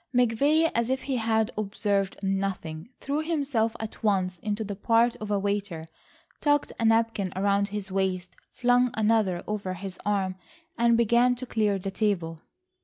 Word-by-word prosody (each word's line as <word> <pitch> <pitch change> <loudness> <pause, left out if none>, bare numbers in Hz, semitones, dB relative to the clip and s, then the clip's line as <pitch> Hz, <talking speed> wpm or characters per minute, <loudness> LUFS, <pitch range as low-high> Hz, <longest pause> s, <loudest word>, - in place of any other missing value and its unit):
McVay, 280 +7 +3
as 235 +1 0
if 260 0 -1
he 270 -2 -1
had 220 -1 +1
observed 200 -1 -1
nothing, 190 -3 -2
threw 285 +2 -2
himself 280 -9 0
at 220 -1 -7
once 185 -4 +1
into 210 +3 -2
the 205 -1 -5
part 230 +3 +3
of 215 - -7
a 205 - +2
waiter, 200 -5 -2 0.5
tucked 290 -1 +2
a 230 - +1
napkin 225 -4 +2
round 200 +1 +2
his 205 -1 -5
waist, 185 -2 -1 0.2
flung 245 0 +3
another 215 -5 +2
over 200 -3 -3
his 185 0 -8
arm 195 -3 0 0.4
and 235 0 +3
began 235 +2 +4
to 250 +1 -6
clear 210 -4 +1
the 195 +1 -4
table. 175 -6 -1
210 Hz, 160 wpm, -27 LUFS, 195-235 Hz, 0.5 s, began